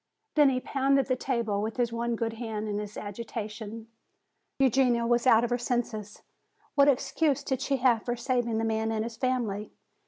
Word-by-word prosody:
Then 295 -2 +6
he 255 -1 0
pounded 275 +1 +1
the 255 - +1
table 235 -6 -1
with 220 +3 -3
his 240 -2 0
one 235 0 -1
good 225 0 -2
hand 220 -2 -4
in 205 -1 -2
his 210 0 -7
agitation. 220 +1 -6 0.7
"Eugenia 255 -3 +3
was 240 +1 +2
out 230 -2 +6
of 240 - -1
her 245 - +1
senses. 235 -4 -3 0.5
What 280 -1 +5
excuse 285 +1 +2
did 265 -1 -2
she 275 0 0
have 245 -3 +3
for 240 - -1
saving 240 -2 0
the 225 - 0
man 220 0 0
and 220 -1 -1
his 230 0 -6
family? 225 -4 -1
235 Hz, 185 wpm, -28 LUFS, 220-255 Hz, 0.7 s, Then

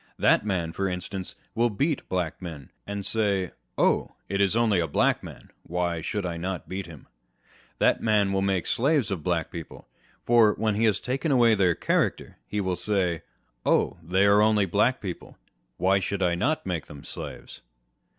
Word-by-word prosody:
That - - +4
man, 90 -6 -2
for 95 +2 -1
instance, 90 +1 -4 0.2
will 120 +1 +2
beat 140 +8 -1
Black 90 -2 -2
men, 80 -7 -8 0.2
and 100 -1 -4
say, 100 -5 +1 0.3
Oh, - - +2 0.2
it 100 0 0
is 100 +1 +2
only 115 -5 +3
a 85 - 0
Black 70 - +2
man, - - -12
why 85 -1 -2
should 100 +5 -3
not 90 +1 -3
I - - -33
beat 95 0 -5
him? 80 -4 -12 0.7
That - - +3
man 105 -3 +2
will 95 - +1
make 95 -2 0
slaves 140 -2 +1
of 95 -5 -2
Black 85 0 -1
people; 85 -3 -9 0.4
for, 115 -3 +5
when 110 -1 0
he 110 +3 +1
has 110 -3 +2
taken 135 +5 -2
away 120 -4 +5
their 95 -5 +3
character, - - -1
he 105 - -2
will 95 -2 0
say, 90 -5 +1 0.4
Oh9 - - +2
they 95 +2 +4
are 100 +1 +5
only 105 -2 +4
Black 105 +8 +1
people, 90 -4 -7 0.4
why 95 +2 +3
should 95 +1 -3
not 90 - +2
I - - -27
make 85 -4 -3
them 70 -1 -11
slaves - - -8
95 Hz, 180 wpm, -26 LUFS, 90-105 Hz, 0.7 s, for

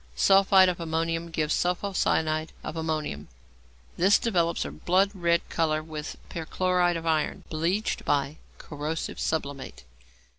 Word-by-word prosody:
Sulphide 195 - +5
of 180 -1 -1
ammonium 165 0 -2
gives 155 -2 -1
sulpho 180 +3 -1
cyanide 155 -3 0
of - - -6
ammonium. 155 - -3 0.7
This 195 +4 +5
develops 170 - 0
a 70 - -5
blood 185 - +1
red 170 -3 +1
colour 155 -2 0
with 155 -1 -7
perchloride 175 +1 0
of 165 - -7
iron, 160 -2 0
bleached 170 +7 -1
by 145 +1 0 0.2
corrosive 150 +2 -5
sublimate. 140 - -3
165 Hz, 125 wpm, -27 LUFS, 155-180 Hz, 0.7 s, Sulphide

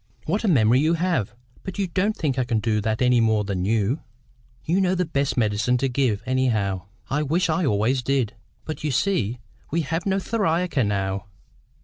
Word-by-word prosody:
'" - - -33
"What 200 +8 -1
a - - +1
memory 125 - +4
you 160 +4 +3
have! 165 - -1 0.3
But 190 +1 -7
you 200 - +1
don't 195 +4 0
think 135 -5 -1
I - - +3
can 120 -2 0
do 105 -1 0
that 110 +3 0
any 125 -1 +4
more 110 -2 +2
than 95 -3 -2
you?" 110 +6 +1 0.7
"You 180 +5 +2
know 185 0 +2
the 180 0 0
best 140 -4 -1
medicine 110 +2 +2
to 135 +2 0
give, 125 -5 0
anyhow. 110 -8 0 0.2
I 145 +2 +1
wish 165 +4 +1
I 160 0 +1
always 110 +5 +1
did. 130 -4 0 0.3
But 155 -1 -6
you 150 - 0
see 125 - 0 0.3
we 170 +3 0
have 165 +6 -2
no 195 0 +2
theriaca 180 - 0
now." 100 -2 -1
130 Hz, 200 wpm, -24 LUFS, 110-165 Hz, 0.7 s, memory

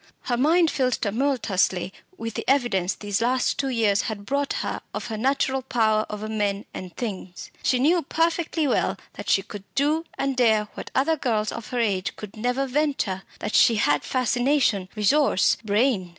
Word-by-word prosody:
Her 245 - -1
mind 320 +6 +3
filled 255 -2 0
tumultuously 205 -6 0 0.2
with 230 -1 -5
the - - -4
evidence 240 -9 +2
these 205 0 -2
last 250 +2 +1
two 275 - 0
years 220 -5 +2
had 205 -2 -6
brought 280 +3 -1
her - - -3
of - - -4
her 220 - -3
natural 265 +2 +1
power 220 -4 +1
over 210 0 -5
men 205 -2 -1
and 180 -2 -8
things. 190 -6 -6
She 255 - +2
knew 325 +7 +3
perfectly 325 0 0
well - - +1 0.2
that - - -7
she 195 - +3
could 205 - -8
do 300 +4 +1
and 275 0 -1
dare 220 -4 +3
what - - -8
other 315 +4 +2
girls 220 -6 0
of 230 -2 -7
her 250 - -3
age 200 -5 0
could 210 -2 -9
never 250 +5 0
venture 270 -9 -1 0.2
that - - -3
she 230 - +5
had 145 -8 +2
fascination, 245 -5 +1
resource, 220 +1 +3
brain. 210 -3 +1
235 Hz, 175 wpm, -24 LUFS, 205-275 Hz, 0.2 s, she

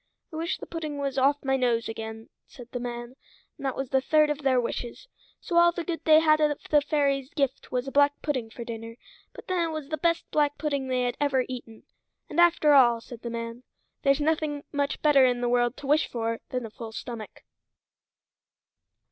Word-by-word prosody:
"I - - -6
wish 330 +2 -2
the - - -8
pudding 310 -3 -5
was 275 -1 -1
off 285 +2 +2
my 270 0 +2
nose 240 -3 +1
again," 225 0 -7 0.2
said 245 -1 -13
the 245 - -3
man, 240 +1 -6 0.4
and - - -8
that 265 - -2
was 270 -2 -4
the 265 -1 +3
third 305 +2 +3
of 295 - -3
their 265 -3 +2
wishes. 240 - -4 0.3
So 345 - -2
all 345 0 +7
the 345 0 -4
good 330 -2 -4
they 310 -1 +7
had 310 -1 +4
of 295 -1 +2
the 295 -1 +6
fairy's 280 -3 0
gift 275 -3 -1
was 250 +1 -1
a - - -4
black 285 +1 +3
pudding 255 -7 -2
for 235 - -8
dinner; 230 0 -7 0.4
but - - -12
then 365 -2 +1
it - - -5
was 310 -3 -6
the 310 - -2
best 335 -1 +1
black 295 -1 +1
pudding 285 -3 -2
they 255 -1 0
had 245 0 -2
ever 270 -3 +1
eaten. 235 -3 -8 0.5
"And 320 - -1
after 330 -3 +5
all," 240 -4 +6
said 230 0 -11
the 235 - -5
man, 230 +1 -5 0.4
"there's 275 -1 +3
nothing 300 -1 0
much 285 -1 -1
better 290 -3 +6
in 250 -1 +3
the 245 - 0
world 240 +1 +1
to - - -9
wish 300 +3 +3
for 230 -1 -3
than 250 -2 -3
a 220 - -9
full 225 0 -8
stomach." 225 -2 -8
275 Hz, 215 wpm, -27 LUFS, 240-300 Hz, 0.5 s, all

